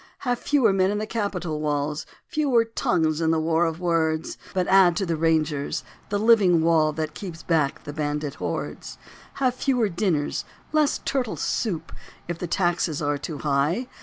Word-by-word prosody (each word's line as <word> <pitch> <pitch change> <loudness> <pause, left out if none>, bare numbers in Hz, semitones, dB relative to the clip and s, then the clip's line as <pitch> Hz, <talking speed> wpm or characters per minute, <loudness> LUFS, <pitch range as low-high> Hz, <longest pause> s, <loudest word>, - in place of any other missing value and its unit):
Have 245 -2 0
fewer 260 -9 +3
men 190 0 +3
in 205 - -1
the 215 - -2
capitol 185 -8 -3
walls, 150 0 -1 0.2
Fewer 280 -8 +2
tongues 160 -8 0
in 160 - +2
the 160 0 +2
war 165 +1 +2
of 165 0 -2
words, 160 -2 0 0.2
But 185 -1 0
add 190 -2 +5
to 195 - 0
the 170 -2 -1
Rangers, 155 -2 0 0.3
the 205 - 0
living 200 -6 +5
wall 160 -2 +4
That 155 0 -3
keeps 170 -2 -8
back 155 -5 0
the 145 - -7
bandit 150 -1 -2
hordes. - - -4 0.4
Have 255 -2 +1
fewer 250 -4 +1
dinners, 170 -5 0 0.3
less 305 -1 +2
turtle 255 -5 -1
soup, 170 -8 -2 0.4
If 170 0 -4
the 175 - -3
taxes 175 -2 0
are 145 -2 -1
too 150 +1 -5
high. 150 - +1
170 Hz, 170 wpm, -24 LUFS, 155-210 Hz, 0.4 s, add